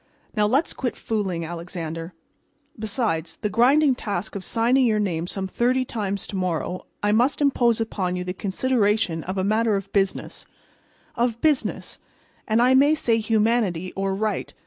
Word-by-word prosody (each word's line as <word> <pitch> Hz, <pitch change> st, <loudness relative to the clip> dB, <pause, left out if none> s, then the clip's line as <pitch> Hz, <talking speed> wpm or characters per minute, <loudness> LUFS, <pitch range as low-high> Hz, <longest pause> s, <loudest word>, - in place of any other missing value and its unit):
Now, 210 Hz, -1 st, +3 dB
let's 275 Hz, +9 st, +2 dB
quit 250 Hz, -3 st, -3 dB
fooling, 190 Hz, -7 st, -2 dB
Alexander. 165 Hz, 0 st, -6 dB, 0.7 s
Besides 215 Hz, -, -1 dB
the 210 Hz, -, -3 dB
grinding 265 Hz, +6 st, +4 dB
task 205 Hz, -3 st, -4 dB
of 195 Hz, -, -4 dB
signing 245 Hz, +4 st, +2 dB
your 215 Hz, -2 st, +2 dB
name 175 Hz, -5 st, -1 dB
some 190 Hz, +1 st, -2 dB
thirty 250 Hz, +6 st, +1 dB
times 200 Hz, -4 st, -3 dB
to -, -, -6 dB
morrow, 185 Hz, -1 st, -2 dB, 0.2 s
I 205 Hz, -, +3 dB
must 245 Hz, +6 st, +3 dB
impose 245 Hz, -5 st, +3 dB
upon 190 Hz, -5 st, -2 dB
you 180 Hz, -, -3 dB
the 180 Hz, 0 st, -4 dB
consideration 205 Hz, -4 st, 0 dB
of 185 Hz, +2 st, -4 dB
a 190 Hz, -, +1 dB
matter 215 Hz, +2 st, +2 dB
of 195 Hz, 0 st, -5 dB
business—of 225 Hz, +4 st, -3 dB
business, 300 Hz, -2 st, 0 dB, 0.5 s
and 225 Hz, +2 st, +3 dB
I 255 Hz, +1 st, +5 dB
may 285 Hz, +4 st, +5 dB
say 230 Hz, -6 st, +1 dB
humanity 215 Hz, -5 st, +1 dB
or 195 Hz, 0 st, -1 dB
right. 210 Hz, -1 st, -2 dB
210 Hz, 155 wpm, -24 LUFS, 185-240 Hz, 0.7 s, I